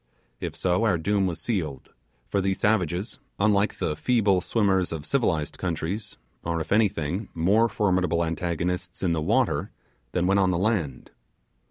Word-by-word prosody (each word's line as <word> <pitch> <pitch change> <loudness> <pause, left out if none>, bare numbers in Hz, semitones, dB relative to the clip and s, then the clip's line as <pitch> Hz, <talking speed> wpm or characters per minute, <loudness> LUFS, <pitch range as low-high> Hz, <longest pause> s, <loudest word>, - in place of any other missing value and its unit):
If - - -4
so 90 +3 +1
our 100 -6 +3
doom 100 +3 +1
was 85 -2 -3
sealed, 80 - -3 0.3
for 100 - 0
these 95 0 0
savages, 100 +1 0 0.2
unlike 100 0 +2
the 75 - -1
feeble 105 -2 +2
swimmer 100 -2 +2
of 80 -4 -3
civilized 90 - 0
countries, 90 +5 -3 0.3
are, 85 0 -1
if 80 - -5
anything, 100 -2 +1
more 100 +8 +3
formidable 90 -5 +1
antagonists 90 +2 -3
in 85 -2 +2
the 80 - -1
water - - +1 0.4
than 90 -1 +1
when 100 +2 +3
on 95 -1 +3
the 90 - +1
land. 90 - -1
90 Hz, 155 wpm, -26 LUFS, 85-100 Hz, 0.4 s, our